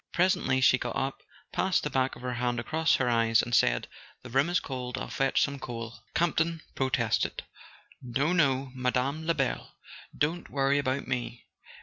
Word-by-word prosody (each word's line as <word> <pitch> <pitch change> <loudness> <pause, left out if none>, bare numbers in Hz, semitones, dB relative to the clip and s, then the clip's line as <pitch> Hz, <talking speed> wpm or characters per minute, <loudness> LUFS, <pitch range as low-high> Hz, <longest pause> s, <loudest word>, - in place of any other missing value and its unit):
Presently 170 -7 +2
she 125 -1 +5
got 120 - -3
up, 135 +1 -2 0.3
passed 190 0 +1
the 150 - -2
back 130 0 +1
of - - -13
her 125 0 -2
hand 120 0 -1
across 160 +7 +2
her 130 - 0
eyes, 115 -1 +3
and 120 - -5
said: - - +3 0.4
"The 125 - -10
room 135 +6 +3
is 175 - +2
cold. 125 -1 -5
I'll - - -5
fetch 135 0 +2
some 140 -1 -2
coal." 115 -2 -6 0.2
Campton 165 -1 +1
protested. 125 -4 0 0.6
"No, 135 +7 0
no, 135 -5 +2
Mme. 130 +4 -1
Lebel. 150 -6 -1 0.4
Don't 165 +4 -1
worry 140 0 +2
about 135 0 -1
me. 125 -2 -3
130 Hz, 165 wpm, -29 LUFS, 125-145 Hz, 0.6 s, she